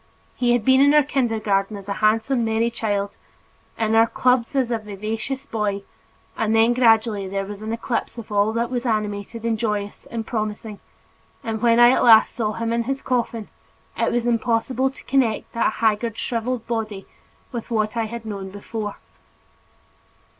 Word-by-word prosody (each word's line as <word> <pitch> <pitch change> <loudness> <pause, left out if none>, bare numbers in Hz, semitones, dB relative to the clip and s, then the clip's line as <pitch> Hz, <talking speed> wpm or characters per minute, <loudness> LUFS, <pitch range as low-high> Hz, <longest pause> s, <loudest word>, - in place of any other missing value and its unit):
He 240 -1 +2
had 240 -3 0
been 260 0 +5
in 285 +1 +5
our 300 - +6
kindergarten 220 -7 0
as 200 -1 -11
a 200 - -1
handsome 225 +4 +2
merry 225 +1 +1
child, 205 -3 -2 0.6
in 220 -1 0
our 225 +1 +5
clubs 250 +1 +1
as 255 -3 +1
a 230 - 0
vivacious 215 +6 -5
boy, 210 -5 -2 0.5
and 225 0 0
then 225 +2 +5
gradually 225 -4 +3
there 195 +1 -3
was 205 +1 -8
an 220 +1 -4
eclipse 230 +1 -3
of 225 -2 -9
all 205 +1 +2
that 235 +2 -1
was 245 -1 -2
animated 215 -1 -2
and 230 -1 0
joyous 210 -3 -3
and 230 -1 -4
promising, 215 -2 -4 0.6
and 220 -1 -3
when 235 -1 +4
I 240 0 +8
at - - +2
last 225 -2 +7
saw 215 -3 -1
him 230 +1 -2
in 235 0 0
his 270 +2 -3
coffin, 235 -3 -2 0.5
it - - 0
was 240 0 0
impossible 240 +2 +1
to 265 - -14
connect 250 -5 0
that 230 - +1
haggard 220 0 0
shriveled 235 0 -2
body 220 -4 -3 0.5
with 235 -2 -6
what 215 -1 0
I 230 -1 0
had 230 +1 -7
known 200 -3 -5
before. 205 +1 -5
225 Hz, 175 wpm, -22 LUFS, 215-240 Hz, 0.6 s, I